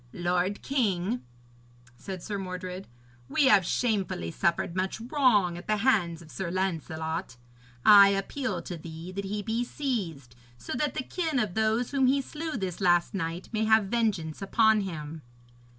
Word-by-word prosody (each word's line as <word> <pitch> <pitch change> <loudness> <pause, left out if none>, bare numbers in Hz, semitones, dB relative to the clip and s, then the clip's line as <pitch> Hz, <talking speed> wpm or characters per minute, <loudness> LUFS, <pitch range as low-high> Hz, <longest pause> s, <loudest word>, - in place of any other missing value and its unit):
'Lord 180 +3 -1
king,' 225 -4 0 0.7
said 185 +6 -7
Sir 205 -2 -4
Mordred, 185 0 -6 0.4
'we 295 - +3
have 200 -7 +6
shamefully 190 - -1
suffered 170 - 0
much 190 +2 -1
wrong 225 - +2
at - - -13
the 215 0 +2
hands 175 -10 +2
of 155 - -15
Sir 190 -3 -4
Lancelot. 165 -5 -3 0.5
I 200 -1 +10
appeal 195 -1 -2
to 175 - -6
thee 165 +2 -8
that 200 +1 -4
he 205 +1 -3
be 225 +2 -1
seized, 185 - -4 0.2
so - - -6
that 270 +1 -1
the - - -2
kin 320 -1 -2
of 215 -7 0
those 220 +3 +1
whom 270 -2 +3
he 275 +2 +3
slew 305 +1 -5
this 190 -3 -4
last 175 -2 +3
night 170 -2 -4
may 220 -1 0
have 220 -2 +4
vengeance 205 -10 -1
upon 220 +2 +3
him.' 160 -4 -6
195 Hz, 160 wpm, -28 LUFS, 175-225 Hz, 0.7 s, I